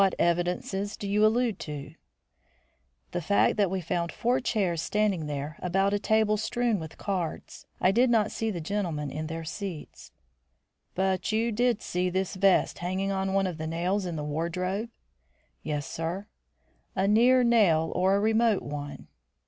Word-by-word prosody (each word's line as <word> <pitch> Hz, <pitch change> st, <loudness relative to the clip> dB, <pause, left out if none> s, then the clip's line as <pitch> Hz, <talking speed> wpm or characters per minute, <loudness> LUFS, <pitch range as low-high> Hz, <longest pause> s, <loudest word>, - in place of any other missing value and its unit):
"What 195 Hz, -1 st, +3 dB
evidences 180 Hz, +4 st, 0 dB
do 200 Hz, -, -5 dB
you 205 Hz, +2 st, +2 dB
allude 225 Hz, -1 st, +2 dB
to?" 150 Hz, 0 st, -7 dB, 1.2 s
"The 175 Hz, -, -2 dB
fact 200 Hz, +5 st, +3 dB
that 200 Hz, -3 st, +3 dB
we 190 Hz, 0 st, -2 dB
found 170 Hz, +1 st, -2 dB
four 245 Hz, +2 st, +1 dB
chairs 195 Hz, -10 st, 0 dB
standing 205 Hz, -7 st, 0 dB
there 145 Hz, +1 st, -4 dB
about 195 Hz, +3 st, +1 dB
a 205 Hz, -, +1 dB
table 220 Hz, 0 st, +2 dB
strewn 225 Hz, 0 st, 0 dB
with 160 Hz, -1 st, -8 dB
cards. 185 Hz, -5 st, -4 dB
I 185 Hz, -, +4 dB
did 240 Hz, +5 st, +3 dB
not 220 Hz, -3 st, +3 dB
see 225 Hz, -, -2 dB
the 175 Hz, -6 st, -3 dB
gentlemen 160 Hz, -6 st, -2 dB
in 155 Hz, +2 st, -4 dB
their 165 Hz, +1 st, -5 dB
seats." 175 Hz, -1 st, -7 dB, 0.8 s
"But 190 Hz, +2 st, 0 dB
you 225 Hz, +2 st, +1 dB
did 240 Hz, +1 st, +1 dB
see 180 Hz, +1 st, -1 dB
this 190 Hz, +2 st, -1 dB
vest 195 Hz, -1 st, +3 dB
hanging 185 Hz, +3 st, -1 dB
on 190 Hz, 0 st, -1 dB
one 195 Hz, 0 st, +3 dB
of 175 Hz, -4 st, -4 dB
the 155 Hz, -, -3 dB
nails 180 Hz, +4 st, -1 dB
in 170 Hz, -, -4 dB
the 150 Hz, -, -3 dB
wardrobe?" 180 Hz, +8 st, -2 dB, 0.7 s
"Yes, 150 Hz, -1 st, -3 dB
sir." 170 Hz, +6 st, -4 dB, 0.7 s
"A 190 Hz, +1 st, +1 dB
near 245 Hz, +5 st, +5 dB
nail 185 Hz, -10 st, +4 dB
or 190 Hz, +2 st, +3 dB
a -, -, +2 dB
remote 220 Hz, 0 st, +2 dB
one?" 145 Hz, 0 st, -6 dB
190 Hz, 165 wpm, -28 LUFS, 165-210 Hz, 1.2 s, near